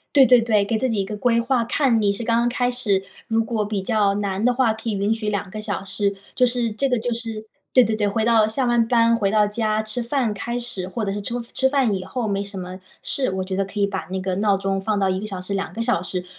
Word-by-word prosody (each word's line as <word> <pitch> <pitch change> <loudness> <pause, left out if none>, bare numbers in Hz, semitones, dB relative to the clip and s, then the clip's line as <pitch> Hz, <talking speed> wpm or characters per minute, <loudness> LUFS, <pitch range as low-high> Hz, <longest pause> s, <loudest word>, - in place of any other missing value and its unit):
对 270 -2 +8
对 250 0 +6
对， 220 -3 +2
给 220 +3 -1
自 255 +3 0
己 220 - -1
一 - - 0
个 210 +2 -5
规 235 +2 +2
划 240 0 +1
看 235 -2 +2
你 200 -1 +3
是 200 +4 -4
刚 230 0 +2
刚 240 - +2
开 245 0 0
始， 210 -6 0 0.2
如 225 0 +1
果 220 -2 -1
比 205 -1 -2
较 205 0 +2
难 200 0 -2
的 250 - +4
话， 245 -2 +2
可 220 +1 -4
以 - - -1
允 200 +2 +1
许 220 -1 -4
2 200 -1 -2
个 215 - -6
小 205 -2 -4
时， 200 +1 -1 0.2
就 255 - +3
是 240 -2 +1
这 275 +6 0
个 250 -2 +1
就 240 +1 -2
是 225 -2 -6 0.3
对 255 - +6
对 220 0 0
对， 210 -1 0
回 220 +2 0
到 225 -2 +4
下 260 +5 -1
完 240 -1 +2
班 230 -1 +4
回 200 -4 +1
到 210 0 +4
家 215 0 0
吃 215 +3 -2
饭 235 -3 0
开 235 +4 -3
始 200 -7 -4
或 220 +3 -3
者 195 - -2
是 205 - -3
吃 235 - -3 0.2
吃 265 - +3
饭 265 -6 +2
以 190 - -3
后 235 +5 -3
没 200 -1 -1
什 200 -1 -7
么 185 +1 -7 0.2
事， 265 -2 0
我 190 0 -2
觉 190 0 -4
得 195 +1 0
可 195 +2 -8
以 200 - +3
把 195 -1 -4
那 190 0 -2
个 185 0 -2
闹 200 0 +2
钟 195 0 -1
放 210 +1 -1
到 195 -1 +2
1 185 0 -1
个 210 - -5
小 195 -3 -5
时 190 +2 -5
2 195 0 -3
个 230 - -6
小 230 -7 +1
时， 180 0 -4
215 Hz, 300 characters per minute, -22 LUFS, 200-235 Hz, 0.3 s, 对